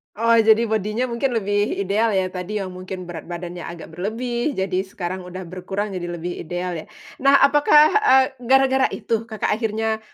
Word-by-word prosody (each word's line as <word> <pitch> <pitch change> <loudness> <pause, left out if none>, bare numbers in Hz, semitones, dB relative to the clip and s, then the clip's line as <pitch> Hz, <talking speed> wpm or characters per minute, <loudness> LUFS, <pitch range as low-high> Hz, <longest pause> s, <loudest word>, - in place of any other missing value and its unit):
Oh, 230 +1 +3
jadi 220 +1 +5
bodinya 215 +2 -1
mungkin 240 +2 -1
lebih 205 -1 0
ideal 210 +4 +1
ya, 185 -1 0
tadi 185 +3 -4
yang 185 - -5
mungkin 185 0 -7
berat 170 -3 -8
badannya 175 0 -6
agak 170 -1 -9
berlebih, 235 - -2
jadi 190 -1 -1
sekarang 185 -2 -5
udah 185 +1 -7
berkurang 190 +4 -4
jadi 175 -1 -4
lebih 175 +1 -5
ideal 175 +2 -4
ya. - - -9 0.3
Nah 275 +1 +5
apakah, 295 +2 +6
eee, 265 -11 +5 0.2
gara-gara 265 +1 +3
itu 225 0 -2
Kakak 220 -3 -2
akhirnya 220 -1 -1
210 Hz, 170 wpm, -22 LUFS, 180-235 Hz, 0.3 s, apakah